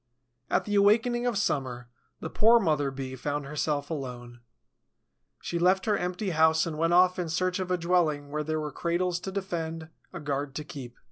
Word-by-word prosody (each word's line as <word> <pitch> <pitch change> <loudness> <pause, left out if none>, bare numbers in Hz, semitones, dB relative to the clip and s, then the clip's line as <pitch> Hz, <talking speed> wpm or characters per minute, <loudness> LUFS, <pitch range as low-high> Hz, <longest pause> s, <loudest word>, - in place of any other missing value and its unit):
At - - +1
the 205 - -3
awakening 235 +4 +3
of 235 -4 0
summer, 130 -10 -1 0.3
the - - -4
poor 230 +2 +5
mother 150 -8 +1
Bee 135 -1 -6
found 145 +2 -3
herself 145 +1 -2
alone. 125 -5 -6 1.0
She 170 - -2
left 185 +2 +3
her 210 - +2
empty 180 +1 -2
house 160 0 +4
and 165 -2 -4
went 165 +1 +2
off 180 +1 +5
in 175 -2 -2
search 180 +3 0
of 185 -1 -3
a 180 - +1
dwelling 165 -5 +1
where 150 +1 -2
there 155 +1 -2
were 150 -1 -4
cradles 175 +3 -1
to 190 - -6
defend, 165 -4 -4 0.2
a - - -7
guard 140 -2 -3
to 150 - -3
keep. 130 -5 -9
165 Hz, 190 wpm, -28 LUFS, 145-185 Hz, 1.0 s, poor